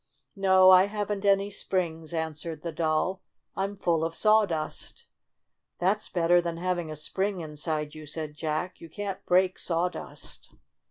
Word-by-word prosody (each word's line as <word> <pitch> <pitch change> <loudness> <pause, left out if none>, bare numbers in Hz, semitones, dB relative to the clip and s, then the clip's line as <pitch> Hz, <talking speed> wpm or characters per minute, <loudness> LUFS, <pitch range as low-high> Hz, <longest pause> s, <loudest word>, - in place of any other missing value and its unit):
"No, 190 -1 +6
I 185 0 +8
haven't 205 -1 -3
any 200 0 +3
springs," 170 -5 -2
answered 160 -1 -4
the 170 - -3
Doll. 165 +4 0 0.3
"I'm 195 +1 -2
full 170 -4 +1
of 165 0 -2
sawdust. 210 -8 +1 0.2
' - - -55
' - - -52
"That's 195 +4 0
better 175 0 +3
than 170 -1 -3
having 175 -2 -2
a 155 - -5
spring 190 +6 -2
in 155 -2 -8
side 150 0 -2
you," 155 -1 -10
said 155 0 -5
Jack. 155 +4 -3
"You 165 - -10
can't 200 +2 -5
break 185 +1 +3
sawdust." 175 +1 -4
175 Hz, 160 wpm, -28 LUFS, 160-190 Hz, 0.3 s, I